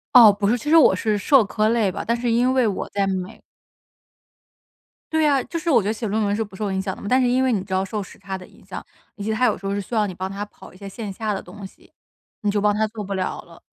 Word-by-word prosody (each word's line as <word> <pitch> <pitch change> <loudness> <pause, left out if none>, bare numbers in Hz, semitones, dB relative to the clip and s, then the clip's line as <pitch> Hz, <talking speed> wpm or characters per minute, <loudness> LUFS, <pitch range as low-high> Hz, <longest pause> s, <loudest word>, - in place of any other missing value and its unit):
哦， 230 -4 +10
不 200 0 -1
是， 230 - +3
其 245 +5 -4
实 325 - +7
我 280 -11 +6
是 210 +2 0
社 255 +4 +4
科 215 +2 0
类 225 -4 +2
吧， - - -5
但 235 - +1
是 240 0 -2
因 245 +3 +2
为 255 -4 +3
我 195 - -3
在 200 -1 0
美 190 +2 -4 1.7
对 315 -1 +3
啊， 275 -3 +2
就 335 - -5
是 340 +1 -3
我 250 -7 +5
觉 200 - -3
得 215 - +1
写 225 0 -4
论 215 +2 0
文 205 0 0
是 225 - -1
不 200 -2 -13
受 205 0 -3
影 190 0 -1
响 190 -1 -4
的 - - -14
嘛， - - -7
但 255 +4 +3
是 250 - +3
因 255 +2 +2
为 255 - +2
你 195 -4 -1
知 190 - -15
道 190 +1 +1
受 210 +2 -4
时 190 - -11
差 195 0 -6
的 185 -1 -9
影 - - -21
响， - - -7 0.3
以 200 - -7
及 220 - -1
他 235 +3 +2
有 220 - +2
时 - - -16
候 195 - -2
是 205 - -1
需 200 +4 -8
要 215 -2 +2
你 185 - -6
帮 185 +2 -4
他 200 +1 -5
跑 205 - -16
一 - - -16
些 200 +1 -8
线 205 0 -6
下 215 +1 -2
的 - - -3
东 195 +2 -11
西， - - -24 0.5
你 210 - 0
就 205 - +1
帮 205 0 +2
他 215 +1 +1
做 215 -1 -7
不 200 0 -5
了 190 -1 -2
了。 - - -17
210 Hz, 330 characters per minute, -22 LUFS, 195-235 Hz, 1.7 s, 哦